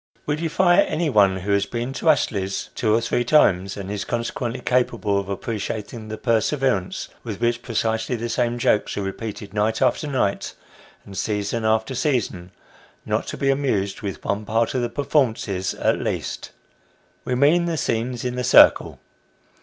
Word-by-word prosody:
We 145 - 0
defy 175 +3 +3
anyone 105 - +2
who 100 +3 -2
has 100 0 +2
been 120 +4 -3
to 160 - 0
Astley's 100 -10 0
two 110 - 0
or 115 - +2
three 120 +1 0
times, 100 -9 +3
and 100 0 -6
is 105 -1 -3
consequently 120 +1 -3
capable 120 -5 +1
of 100 0 -6
appreciating 110 +2 -4
the 110 0 -5
perseverance 115 -3 0
with - - -6
which 120 0 0
precisely 115 0 -1
the 120 0 -3
same 120 0 0
jokes 105 -3 +1
are 100 - -1
repeated 100 0 -6
night 110 +1 0
after 150 - +1
night, 130 -8 -1 0.5
and 100 - -11
season 105 +2 -2
after 110 +3 +1
season, 115 - -1 0.5
not - - -1
to - - -5
be 135 0 +2
amused 105 -9 -1
with 100 -3 -6
one 100 +1 -1
part 110 +2 0
of 130 - 0
the 120 - -1
performances 115 -8 0
at - - +1
least - - -3 0.7
we 125 - -1
mean 150 +7 +4
the 170 -2 -1
scenes 120 -1 -2
in 125 - -1
the 125 0 -3
circle. 125 - +5
115 Hz, 165 wpm, -22 LUFS, 100-130 Hz, 0.7 s, circle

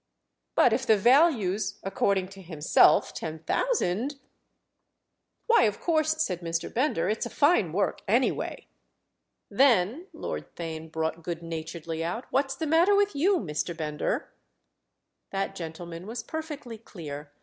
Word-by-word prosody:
"But 240 - +5
if 260 +3 -1
the 220 - +6
value's, 235 - +3
according 195 -1 0
to 195 0 -12
himself, 160 -4 +3
ten 160 0 -5
thousand——?" 265 - 0 1.3
"Why, 460 - +5
of 210 -2 -1
course," 315 -1 +1
said 180 - -3
Mr. 165 0 -3
Bender, 250 - +1
"it's 215 +2 -1
a - - -9
fine 285 - +3
work 195 +5 0
anyway." 235 +6 0 0.9
"Then," 260 - +3
Lord - - -6
Theign 160 -1 -6
brought 160 +1 -2
good 170 0 -5
naturedly 165 0 -5
out, 180 +9 -3
"what's 270 0 +1
the 320 - -3
matter 335 +6 +4
with 405 -4 +2
you, 365 +7 +3
Mr. 165 - -3
Bender?" 150 -2 -2 1.0
That 195 0 -2
gentleman 170 +1 -7
was 230 +1 -5
perfectly 300 -8 -6
clear. 150 -9 -9
195 Hz, 135 wpm, -27 LUFS, 165-280 Hz, 1.3 s, the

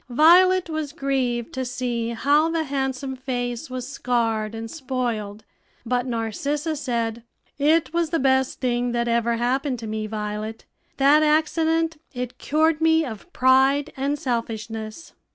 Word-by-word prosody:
Violet 350 +7 +5
was 310 -3 -4
grieved 260 -6 -1
to 260 - -2
see 245 -2 -2
how 285 +7 +2
the 330 -1 0
handsome 270 -1 -2
face 250 +1 -4
was 255 -1 -5
scarred 230 -5 -1
and 225 0 -6
spoiled; 240 -8 -3 0.4
but 250 +2 0
Narcissa 280 +7 -2
said, 235 -5 -2 0.4
"It 315 +3 +3
was 340 -1 +1
the 330 - +1
best 265 -1 +1
thing 245 -1 0
that 235 0 0
ever 235 0 +1
happened 255 +3 0
to 230 - -7
me, 215 0 -3
Violet 215 +1 -5 0.3
that 280 +3 +5
accident; 320 +1 +2 0.2
it 250 0 -5
cured 315 +1 +1
me 320 0 +4
of 235 - -8
pride 270 +2 +3
and 280 +2 -1
selfishness." 225 0 -4
260 Hz, 140 wpm, -23 LUFS, 235-300 Hz, 0.4 s, Violet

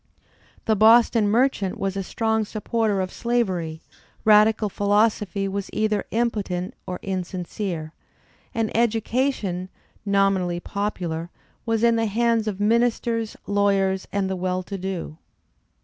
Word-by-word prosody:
The 220 - +3
Boston 225 0 +5
merchant 225 -4 +1
was 195 -1 -2
a 195 - -1
strong 220 +3 0
supporter 215 -1 -1
of 185 0 -4
slavery; 185 -10 -1 0.4
radical 215 0 +5
philosophy 205 -1 +1
was 200 0 -4
either 215 -1 0
impotent 205 -6 -1
or 180 - -3
insincere; 180 -3 -4 0.6
and 225 -3 -2
education, 225 -4 0 0.3
nominally 195 -3 +1
popular, 175 -4 -3 0.4
was 225 0 +1
in 235 -1 +4
the 225 0 +1
hands 230 +1 +1
of 200 -2 -3
ministers, 230 +1 +1
lawyers 195 -2 +1
and 200 -1 0
the 190 - -2
well 185 0 -2
to 195 - -6
do. 180 -4 -5
205 Hz, 120 wpm, -24 LUFS, 190-225 Hz, 0.6 s, Boston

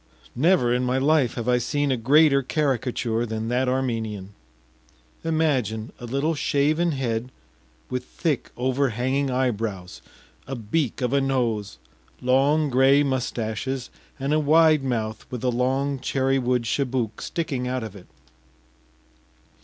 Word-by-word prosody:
Never 140 -4 +3
in 125 +1 +1
my 125 +1 +1
life 140 -2 +2
have 120 -1 -4
I 125 0 +3
seen 145 +3 0
a - - +2
greater 140 +4 +4
caricature 125 -5 -1
than 110 -1 -3
that 125 +1 +1
Armenian. 110 -6 -2 0.9
Imagine 135 -9 0
a 120 - -7
little 140 +7 0
shaven 155 +3 +1
head 125 -2 -2 0.6
with 125 0 -3
thick 155 -7 -2
overhanging 130 +1 0
eyebrows, 110 - -2 0.5
a 135 - -4
beak 120 +4 -2
of 125 +1 0
a 140 - +3
nose, 115 - -1 0.4
long 140 +4 +2
gray 135 +3 +5
mustaches, 125 -1 -2 0.3
and 135 +2 -1
a 155 - +3
wide 155 0 +4
mouth 110 -4 -3
with 125 -2 -6
a 125 - +2
long 135 +3 0
cherry 135 +1 +1
wood 125 -1 +1
chibouk 120 -2 -1
sticking 135 -7 -3
out 130 -1 -2
of 110 -2 -7
it. 95 - -13
130 Hz, 135 wpm, -24 LUFS, 120-140 Hz, 0.9 s, gray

